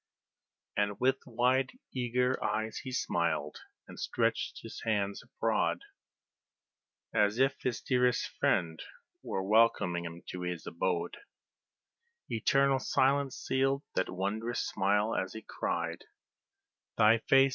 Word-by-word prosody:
And 100 0 0
with 130 +1 +3
wide, 125 +2 +2 0.2
eager 125 0 0
eyes 110 +1 -1
he 130 - -7
smiled, 85 - -1 0.3
and - - -11
stretched - - -1
his - - -8
hands 100 -3 0
abroad, - - 0 1.3
As 105 0 +3
if 135 +1 +3
his 125 -2 -2
dearest 125 -1 +2
friend 80 -2 +1 0.4
were 95 - -3
welcoming 95 -5 +3
him 85 0 -8
to 90 - -5
his 90 -2 -4
abode; 85 0 -2 1.1
Eternal 135 +4 +2
silence 135 +1 +2
sealed 135 +2 0
that 95 - 0
wondrous 105 +6 -2
smile 105 +3 +1
as 95 0 -2
he 110 - -8
cried - - -2 0.9
"Thy 110 +1 +6
face! 135 +4 +5
110 Hz, 115 wpm, -31 LUFS, 95-130 Hz, 1.3 s, Thy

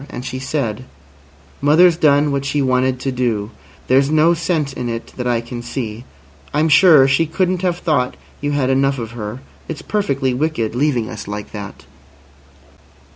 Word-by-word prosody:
And 125 - -7
she 130 0 -4
said: 130 -4 -3 0.8
"Mother's 165 +5 +5
done 145 -2 +3
what 140 -1 -1
she 140 +1 -1
wanted 130 -1 +1
to 135 - -1
do. 115 -4 -1 0.4
There's 135 +2 +3
no 155 +2 +4
sense 160 -4 -1
in 125 -2 -4
it 115 0 -6
that 125 -1 -3
I 120 -1 +1
can 120 +1 -7
see. 120 -1 -5 0.5
I'm 155 +2 +2
sure 150 -3 +7
she 145 +4 +2
couldn't 180 +2 0
have 180 -2 0
thought 145 -8 0 0.2
you 145 0 -1
had 135 -2 +1
enough 135 +1 +2
of 115 -3 -5
her. 115 +1 -6 0.3
It's 160 - -6
perfectly 140 -11 -1
wicked, 130 -5 -1
leaving 125 -3 0
us 110 -2 -8
like 105 0 -6
that." 100 -2 -8
135 Hz, 170 wpm, -18 LUFS, 120-150 Hz, 0.8 s, sure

